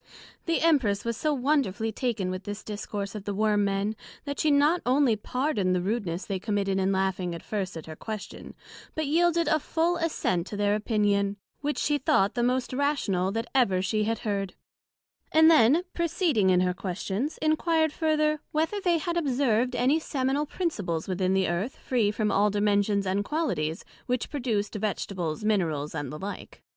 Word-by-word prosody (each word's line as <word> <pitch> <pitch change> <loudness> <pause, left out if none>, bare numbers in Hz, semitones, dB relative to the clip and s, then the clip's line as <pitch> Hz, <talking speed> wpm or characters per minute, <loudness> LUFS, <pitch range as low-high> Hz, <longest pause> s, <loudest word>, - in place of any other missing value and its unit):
The 330 - +1
Empress 260 -12 +2
was 235 0 -1
so 305 +6 0
wonderfully 250 -6 0
taken 220 -5 -2
with 185 +1 -5
this 205 +1 -6
Discourse 205 -1 -5
of 210 -2 -7
the 205 - -3
Worm 210 0 +2
men, 200 +2 0 0.3
that 285 -1 -4
she 310 - +2
not 295 +4 +4
only 255 -2 +3
pardoned 215 -4 0
the - - +1
rudeness 190 -2 -2
they 195 -2 -3
committed 200 -1 0
in 190 0 +1
laughing 190 -2 -1
at 170 - -9
first 195 -5 -3
at 160 - -8
her 160 - -8
question, 215 +4 -7 0.4
but 315 - -1
yielded 335 +2 +2
a 310 - +3
full 335 +4 0
assent 205 - -1
to 205 - -6
their 205 0 +2
opinion, 205 -2 +1 0.2
which 295 +1 -2
she 295 -1 +1
thought 200 -5 +2
the 240 - -1
most 250 +1 0
rational 240 -10 0
that 225 +1 -2
ever 235 -9 +3
she 210 +3 0
had 225 +1 0
heard 195 -3 -2 0.8
yet; 315 - +5
and 320 +1 +8
then 305 +3 +5
proceeding 330 - +1
in 180 -1 +4
her 180 0 +1
questions, 195 - -3
enquired 315 0 +2
further, 305 -1 +1
whether 320 +7 0
they 350 -3 +2
had 340 +2 -2
observed 255 -5 +1
any 270 +6 +3
seminal 280 -1 -1
principles 205 - -2
within 185 0 0
the 190 -1 +2
Earth 180 +9 -2
free 235 -5 +1
from 210 0 0
all 205 +1 +3
dimensions 205 0 +1
and 190 +2 0
qualities, 185 - -2 0.2
which 250 -1 -1
produced 230 -8 -1
Vegetables, 195 -5 -3
Minerals, 165 -9 0
and 140 -3 -4
the 150 - -6
like? 195 +5 -8
215 Hz, 180 wpm, -27 LUFS, 195-290 Hz, 0.8 s, and